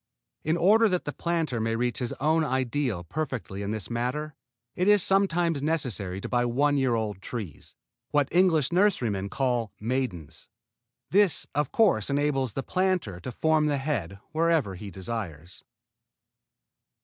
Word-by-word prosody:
In 160 +2 +1
order 215 +6 +5
that 180 -2 -1
the 145 - -3
planter 165 -8 -1
may 115 +1 0
reach 120 0 -1
his 125 -3 -2
own 160 +4 +1
ideal 130 - -1
perfectly 125 - -4
in 100 - -3
this 110 -3 -3
matter, 125 +6 -2 0.4
it 180 - 0
is 205 -3 +6
sometimes 175 -6 +2
necessary 120 - -1
to - - -5
buy 120 -1 +1
one 140 +5 +2
year 130 -4 +2
old 105 -4 -3
trees, 100 - -7 0.3
what 145 -2 +2
the - - -7
English 165 -7 +4
nurserymen 125 - +1
call 120 -1 -1
maidens. 110 - -4 0.6
This, 200 -4 +4
of 145 -1 0
course, 185 - +3
enables 140 -4 0
the 135 - -3
tree - - -31
planter 185 - 0
to 125 - -6
form 155 +4 +2
the 145 -1 +1
head 135 - -3
wherever 160 - +1
he 100 +3 -8
desires. 95 -5 -6
135 Hz, 155 wpm, -27 LUFS, 110-160 Hz, 0.6 s, is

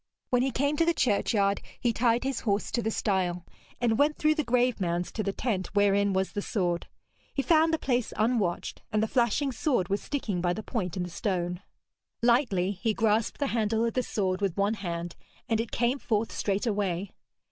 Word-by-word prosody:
When 250 -1 +4
he 265 - +2
came 285 +4 0
to 330 - +4
the 335 0 +2
churchyard, 200 -5 +2 0.2
he 240 -2 +1
tied 235 0 +2
his 265 -3 -1
horse 205 -2 -1
to 240 - 0
the 220 - -1
stile, 185 -5 -1 0.3
and 230 -2 +1
went 300 +1 +3
through 310 0 +3
the 305 - -1
grave 245 -2 +1
mounds 175 0 -1
to 220 - -3
the 200 -1 -1
tent 195 -4 -2
wherein 200 0 +3
was 190 0 0
the 205 - -3
sword. 175 -5 -1 0.5
He 275 - 0
found 320 +1 +4
the 320 - +2
place 250 -5 0
unwatched, 215 -6 0
and 215 -1 +2
the - - +1
flashing 255 +4 +1
sword 245 - 0
was 200 +1 0
sticking 215 -11 -2
by 175 0 +1
the 215 - -5
point 190 -8 -3
in 180 - -1
the 175 - -6
stone. 180 -1 -2 0.6
Lightly 235 -7 +3
he 210 +2 -1
grasped 220 -1 +1
the 285 - 0
handle 225 0 +1
of 230 - -1
the 255 - +1
sword 190 -5 -1
with 195 -3 -1
one 200 +2 +2
hand, 175 -4 -4 0.3
and 225 -1 +1
it 230 - -5
came 245 +3 +1
forth 225 -5 0
straightway! 200 -3 -1
215 Hz, 200 wpm, -28 LUFS, 190-245 Hz, 0.6 s, When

